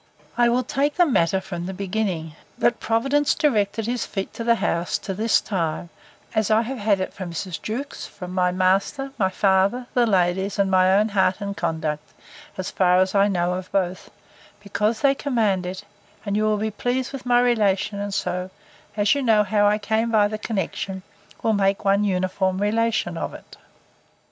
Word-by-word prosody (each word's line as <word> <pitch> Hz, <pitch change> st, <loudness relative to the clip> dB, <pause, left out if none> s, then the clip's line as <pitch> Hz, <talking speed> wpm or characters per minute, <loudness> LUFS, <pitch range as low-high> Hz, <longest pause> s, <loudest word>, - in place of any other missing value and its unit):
I 240 Hz, 0 st, +4 dB
will 250 Hz, +2 st, +1 dB
take 285 Hz, +2 st, -1 dB
the 355 Hz, -, +5 dB
matter 190 Hz, -, +2 dB
from 175 Hz, -2 st, -6 dB
the 190 Hz, -, -5 dB
beginning, 185 Hz, -5 st, -2 dB, 0.2 s
that 235 Hz, -, +1 dB
Providence 275 Hz, +6 st, +1 dB
directed 215 Hz, -6 st, +1 dB
his 240 Hz, +1 st, -1 dB
feet 195 Hz, -2 st, -5 dB
to 230 Hz, -, -5 dB
this 235 Hz, 0 st, +3 dB
house, 170 Hz, -3 st, -1 dB
to 195 Hz, -, -5 dB
this 220 Hz, +4 st, +2 dB
time, 170 Hz, -3 st, -3 dB, 0.4 s
as 220 Hz, -2 st, +1 dB
I 220 Hz, +1 st, +4 dB
have 255 Hz, +2 st, -5 dB
had 205 Hz, -2 st, +2 dB
it 185 Hz, -, -3 dB
from 185 Hz, -3 st, -6 dB
Mrs. 175 Hz, +1 st, -5 dB
Jewkes, 250 Hz, +7 st, -5 dB
from 180 Hz, -2 st, -9 dB
my 180 Hz, -1 st, +2 dB
master, 190 Hz, +9 st, +1 dB
my 190 Hz, -2 st, +3 dB
father, 195 Hz, +5 st, +2 dB
the 240 Hz, -1 st, +3 dB
ladies, 190 Hz, 0 st, +1 dB
and 195 Hz, -1 st, +1 dB
my 185 Hz, 0 st, +4 dB
own 210 Hz, +3 st, +3 dB
heart 190 Hz, -2 st, +1 dB
and 200 Hz, -1 st, -4 dB
conduct, 160 Hz, -4 st, -3 dB, 0.4 s
as 185 Hz, -, -4 dB
far 180 Hz, -1 st, +3 dB
as 185 Hz, 0 st, +2 dB
I 200 Hz, 0 st, +4 dB
know 180 Hz, -2 st, 0 dB
of 185 Hz, 0 st, -6 dB
both; 185 Hz, -2 st, -1 dB, 0.5 s
because 210 Hz, +2 st, -1 dB
they 275 Hz, -1 st, +4 dB
command 220 Hz, -10 st, 0 dB
it, 190 Hz, +2 st, -6 dB, 0.4 s
and 200 Hz, -1 st, -1 dB
you 215 Hz, +1 st, +1 dB
will 215 Hz, 0 st, +2 dB
be 220 Hz, +1 st, -2 dB
pleased 245 Hz, +5 st, -2 dB
with 255 Hz, -2 st, -7 dB
my 245 Hz, 0 st, +5 dB
relation 215 Hz, -4 st, +1 dB
and 205 Hz, 0 st, -3 dB
so, 180 Hz, -1 st, -2 dB, 0.5 s
as 205 Hz, -1 st, +3 dB
you 285 Hz, -, -1 dB
know 220 Hz, -4 st, +4 dB
how 205 Hz, 0 st, +2 dB
I 210 Hz, +1 st, +3 dB
came 220 Hz, +2 st, 0 dB
by 215 Hz, -2 st, +4 dB
the 215 Hz, +1 st, -5 dB
connexion, 190 Hz, -2 st, -3 dB, 0.4 s
will 225 Hz, -, +2 dB
make 195 Hz, 0 st, +1 dB
one 200 Hz, +1 st, +3 dB
uniform 185 Hz, -1 st, 0 dB
relation 210 Hz, -5 st, 0 dB
of -, -, -4 dB
it. -, -, -13 dB
200 Hz, 190 wpm, -23 LUFS, 185-225 Hz, 0.5 s, the